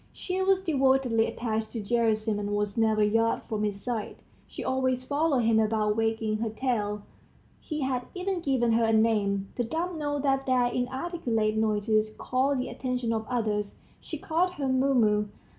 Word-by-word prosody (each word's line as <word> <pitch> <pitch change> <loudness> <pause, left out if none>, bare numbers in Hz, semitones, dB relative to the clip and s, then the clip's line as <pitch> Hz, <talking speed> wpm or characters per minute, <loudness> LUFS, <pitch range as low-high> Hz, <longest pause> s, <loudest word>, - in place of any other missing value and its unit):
She 370 0 -3
was 380 0 +2
devotedly 265 -7 +2
attached 220 -2 -2
to 230 - -3
Gerasim, 220 -1 +1
and 205 0 -2
was 205 -1 -1
never 220 -1 +2
a - - +5
yard 225 +2 +1
from 215 -1 -3
his 205 -1 -3
side; 235 -4 -3 0.3
she - - -7
always 260 -1 0
followed 285 0 +1
him 225 0 +3
about 215 -1 +1
wagging 225 -1 0
her 225 +1 -2
tail. 215 -3 -2 0.6
He 305 -2 -5
had 255 -2 -1
even 370 0 -2
given 265 -7 +1
her 230 0 +3
a 225 - +2
name 205 -3 +2
the 245 - +1
dumb 325 +7 -3
know 290 -1 -1
that 270 -1 0
their 255 -1 +3
inarticulate 245 -3 -1
noises 215 0 +1
call 265 +3 0
the 255 -1 -2
attention 250 -3 -2
of 220 -1 -3
others. 215 -4 -2 0.2
He 315 - -6
called 340 +5 0
her 280 -6 -3
Mumu. 250 -6 +2
235 Hz, 175 wpm, -28 LUFS, 215-270 Hz, 0.6 s, a